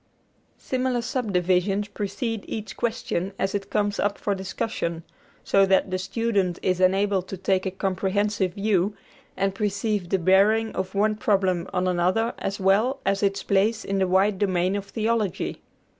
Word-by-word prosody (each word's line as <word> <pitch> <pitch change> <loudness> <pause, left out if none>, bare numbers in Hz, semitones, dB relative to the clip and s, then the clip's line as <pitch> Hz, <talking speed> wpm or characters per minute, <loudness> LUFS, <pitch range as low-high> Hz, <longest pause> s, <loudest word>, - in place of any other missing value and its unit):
Similar 255 -2 -1
subdivisions 195 -4 0
precede 205 +2 -3
each 215 -1 -5
question 220 -5 -2
as 195 - -1
it 200 -1 -3
comes 205 -1 0
up 205 0 0
for 205 - -1
discussion, 185 -3 -3 0.4
so 195 - +4
that 190 0 +2
the 185 - -1
student 195 -2 0
is 185 -1 +1
enabled 190 0 +2
to 190 - -6
take 190 +1 0
a - - +1
comprehensive 190 0 -1
view, 200 -1 +1 0.4
and 195 0 +1
perceive 205 -2 -1
the 195 - +2
bearing 200 +5 +3
of 190 +1 -3
one 215 +2 +2
problem 190 -4 +1
on 180 0 0
another 185 +6 +1
as 195 +1 -3
well 210 +8 +2
as 195 0 +1
its 200 -1 0
place 210 +3 +1
in 195 0 -1
the 190 - +2
wide 190 +2 +2
domain 185 -1 +1
of 200 -1 -3
theology. 220 -2 -1
195 Hz, 160 wpm, -25 LUFS, 185-210 Hz, 0.4 s, so